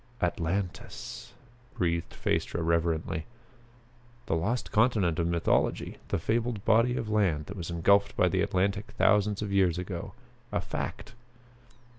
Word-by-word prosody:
"Atlantis!" 90 +2 -3 0.4
breathed 85 -2 -1
Phaestra 85 - -1
reverently. 80 -1 0 1.0
The - - 0
lost 110 +10 -1
continent 105 -8 +3
of 85 - +1
mythology! 85 -1 +1
The - - 0
fabled 115 +3 -1
body 115 +3 +4
of 115 - -3
land 95 -9 +1
that 100 - -8
was 90 -4 -5
engulfed 100 +4 +3
by - - +4
the - - +1
Atlantic 100 +2 0
thousands 105 0 +3
of 100 -1 -3
years 95 -4 +3
ago 90 -1 -5 0.4
a - - 0
fact! - - -5
95 Hz, 130 wpm, -29 LUFS, 85-105 Hz, 1.0 s, body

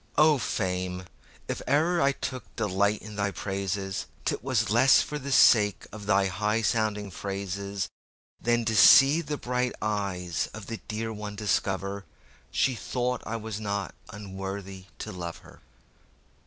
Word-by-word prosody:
O 150 -1 +6
Fame! 90 -3 -2 0.4
if - - -3
I - - +2
e'er 160 -1 +3
took 130 -1 -6
delight 100 -1 +1
in 105 0 -9
thy 100 0 +1
praises,'Twas 100 +4 -2
less 125 +4 +6
for 150 - -5
the 140 0 -5
sake 105 -8 +5
of 105 -1 -9
thy 100 -2 +4
high 105 +4 0
sounding 105 -2 0
phrases, 100 0 -4 0.5
Than 120 0 +1
to 110 0 0
see 140 +8 +8
the 150 -2 -4
bright 125 -1 -1
eyes 100 -5 -2
of 110 -3 -8
the 115 +2 -5
dear 110 +1 -3
one 105 -1 -6
discoverShe 100 +5 -2
thought 125 -1 -1
that - - -10
I 115 - -2
was 110 -2 -5
not 100 -2 -3 0.2
unworthy 95 -2 -7
to - - -6
love 85 -2 -6
her. - - -15
105 Hz, 140 wpm, -27 LUFS, 95-120 Hz, 0.5 s, see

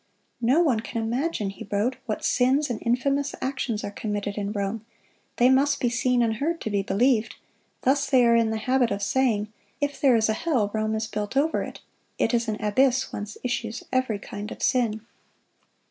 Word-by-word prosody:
"No 255 +8 +4
one 255 -9 +2
can 230 +1 -4
imagine," 235 -2 -1
he 195 - -10
wrote, 215 +6 +1
"what 215 - -3
sins 265 +3 +2
and 225 - -4
infamous 275 +4 0
actions 255 -5 -2
are - - -4
committed 205 -1 -3
in 205 -1 -3
Rome; 205 +1 -3 0.5
they 245 - +5
must 280 +2 +3
be 245 - +1
seen 245 +1 +2
and 220 -1 0
heard 330 +6 -1
to 220 - -3
be 200 -1 +1
believed. 225 +4 +1 0.5
Thus 275 +1 +2
they 255 -3 +5
are 235 0 +5
in 230 -1 +3
the 220 - -1
habit 250 +2 +2
of 200 0 -2
saying, 215 -3 +1 0.3
'If 285 +1 -2
there 270 -5 +5
is 220 -1 +3
a 220 - +1
hell, 225 -6 0
Rome 215 0 0
is 220 +1 -1
built 210 +2 -4
over 310 +3 +2
it: - - -7 0.4
it - - +1
is 235 0 +1
an 215 -1 -2
abyss 255 +5 +2
whence 205 +1 -6
issues 235 -2 -3
every 255 -5 +1
kind 205 +1 -7
of - - -7
sin. 230 -4 +1
235 Hz, 195 wpm, -25 LUFS, 215-260 Hz, 0.5 s, they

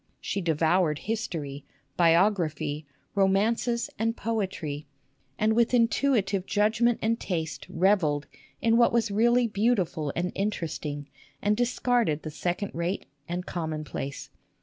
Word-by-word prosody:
She 200 - -2
devoured 165 -1 +2
history, 160 -10 -4 0.3
biography, 165 -4 +2 0.3
romances, 225 +5 +2
and 225 +1 0
poetry, 185 -10 -3 0.5
and 215 +1 +2
with 235 +2 +3
intuitive 230 -5 +2
judgment 220 +3 +2
and 230 +1 +1
taste 160 -4 -3
revelled 165 -5 +2 0.4
in 230 0 +4
what 235 -1 +5
was 230 -2 +1
really 235 +3 +3
beauti 210 -2 +2
ful 150 -3 -4
and 180 +2 -1
interesting, 155 -7 -3 0.3
and 210 +1 +2
discarded 245 -8 +1
the 155 - -5
second 180 +6 -2
rate 170 +4 -2 0.2
and 180 +1 -3
commonplace. 155 -4 -4
195 Hz, 120 wpm, -27 LUFS, 160-225 Hz, 0.5 s, what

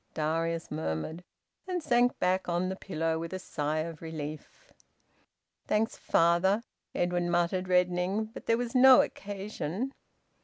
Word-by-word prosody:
Darius 165 +2 -1
murmured, 155 - -3 0.4
and 360 -3 -2
sank 245 -1 +3
back 185 0 0
on 175 +2 0
the 190 - -3
pillow 165 -4 -2
with 165 +2 -5
a - - -2
sigh 155 -4 -2
of 165 -1 -6
relief. 155 - -8 1.0
"Thanks, 220 +2 +1
father," 175 +6 +2 0.3
Edwin 175 0 0
muttered, 175 +2 +1
reddening. 180 +3 +1
"But 220 - -11
there 230 - +3
was 240 -1 -3
no 260 0 +8
occasion." 205 - -5
180 Hz, 130 wpm, -29 LUFS, 165-210 Hz, 1.0 s, no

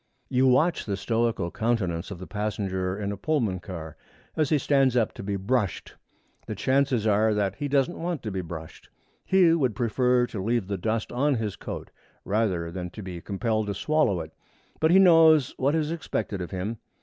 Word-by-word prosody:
You 130 +1 +3
watch 145 +6 +2
the 100 -2 -1
stoical 115 -3 0
countenance 100 -8 -1
of 100 - -6
the 95 - -8
passenger 95 -3 -2
in 100 -1 -2
a 100 - -5
Pullman 115 -7 0
car 80 -4 -8 0.4
as 155 -3 +1
he 155 - +3
stands 135 -2 +2
up 115 -3 +1
to - - -8
be 100 0 -3
brushed. 100 0 -1 0.5
The - - -4
chances 130 -4 +1
are 110 0 +3
that 100 -1 -1
he 145 - -2
doesn't 140 +3 +1
want 170 -3 -3
to 110 - -3
be 95 -1 -2
brushed. 80 -2 -9 0.3
He 185 -3 +4
would 130 -10 +1
prefer 125 +1 +2
to 105 -5 -5
leave 115 -1 0
the 100 0 -3
dust 110 +3 -2
on 140 +3 +1
his 110 -4 -3
coat - - -7 0.3
rather 95 -6 0
than 90 0 -5
to 105 +4 -9
be 90 -2 -7
compelled 110 +2 -1
to 100 - -2
swallow 125 - +1
it. 80 0 -9 0.5
But 160 - +3
he 180 - +6
knows 165 -6 +6
what 140 +4 +1
is 155 -1 0
expected 105 - -3
of 90 - -5
him. 100 +4 -4
110 Hz, 195 wpm, -26 LUFS, 95-135 Hz, 0.5 s, he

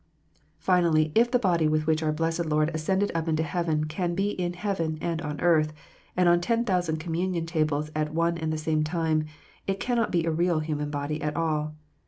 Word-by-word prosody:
.Finally, 165 -4 +3
if 235 +2 +4
the 250 - +3
body 175 -8 +2
with 155 0 +1
which 160 0 +2
our 155 -1 +1
blessed 165 +2 -1
Lord 155 +1 +2
ascended 190 +6 0
up 165 0 -2
into 160 0 +1
heaven 160 -1 0
can 170 +3 -2
be 200 +2 +1
in 175 -3 -2
heaven, 175 -4 -2
and 165 -1 -2
on 150 -2 -4
earth, 155 -3 +3 0.4
and 180 -1 +4
on 175 0 +5
ten 230 +5 +1
thousand 175 -6 0
communion 170 +1 -2
tables 155 -2 0
at 155 0 -1
one 170 +1 +1
and 160 -1 -1
the 155 - -1
same 155 0 0
time, 160 -1 0 0.4
it 195 0 -1
cannot 240 -2 0
be 170 -2 +1
a 165 - +1
real 170 +1 +1
human 150 -1 -2
body 145 +1 -3
at 150 0 -2
all. 155 -2 -1
165 Hz, 205 wpm, -27 LUFS, 155-175 Hz, 0.4 s, on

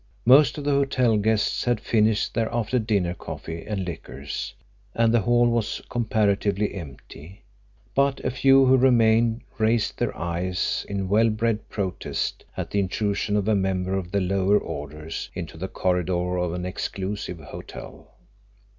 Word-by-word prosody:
Most 135 +6 +6
of 145 - -5
the 145 - +1
hotel 130 -4 +2
guests 105 0 +1
had 120 -3 +1
finished 110 -1 +1
their 115 -1 0
after 120 +2 0
dinner 100 -6 0
coffee 80 -1 -7
and 100 -3 -2
liqueurs, 75 -4 -6 0.4
and 115 0 +3
the 120 - +5
hall 120 +3 +3
was 115 -2 0
comparatively 105 -3 +1
empty, 80 +1 -10 0.5
but 140 0 +2
a 130 - +1
few 135 +1 +5
who 130 +1 +5
remained 115 -2 +4 0.2
raised 110 0 +1
their - - -1
eyes 90 +2 -2
in 100 -1 -2
well 110 +4 +4
bred 110 0 -1
protest 95 -4 -3
at - - -4
the 100 - +1
intrusion 100 +2 -1
of 105 0 -1
a 110 - +3
member 95 -1 0
of 95 -2 -3
the 100 0 +1
lower 95 +2 +2
orders 75 -1 -6
into - - -6
the 90 +4 -4
corridor 90 -1 0
of 90 -1 -1
an 90 0 -4
exclusive 95 0 -4
hotel. 75 - -10
105 Hz, 155 wpm, -24 LUFS, 90-115 Hz, 0.5 s, Most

